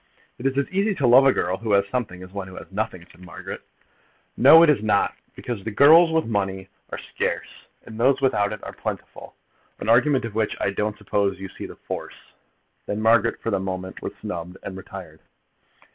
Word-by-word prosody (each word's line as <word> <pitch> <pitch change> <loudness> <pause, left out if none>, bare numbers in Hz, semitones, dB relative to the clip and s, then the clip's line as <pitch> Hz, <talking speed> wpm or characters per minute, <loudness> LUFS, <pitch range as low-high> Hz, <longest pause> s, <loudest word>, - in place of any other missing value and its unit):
"It 130 - 0
is 135 0 -2
as 140 - +1
easy 200 +2 +1
to 140 - 0
love 130 +3 +7
a - - +6
girl 90 -6 -1
who 110 0 -2
has 100 0 +3
something 100 -7 -4
as 90 - -12
one 100 -1 -6
who 95 - -11
has - - -11
nothing," 100 -4 -4
said 90 - -17
Margaret. 90 - -8 0.7
"No, 155 +6 +8
it 165 - +5
is 140 - 0
not; 105 -2 +1 0.2
because 115 -5 -5
the 110 - -3
girls 160 +9 +6
with 160 0 +1
money 95 -3 -2 0.2
are - - -5
scarce, - - -3 0.4
and 110 0 -10
those 130 +3 +3
without 105 -7 +1
it 105 -1 -7
are - - -7
plentiful, - - -7 0.4
an - - -4
argument 125 +2 +4
of 115 - -6
which 110 0 -1
I 100 - 0
don't 105 +1 -2
suppose 100 -1 -1
you 95 0 -7
see - - -8
the - - -11
force." - - -8 0.5
Then 105 - -2
Margaret 115 +1 +2
for 115 - -1
the 100 - +1
moment 95 0 -5
was - - -5
snubbed 90 +1 -6
and 95 - -6
retired. 95 -4 -10
105 Hz, 205 wpm, -23 LUFS, 95-125 Hz, 0.7 s, No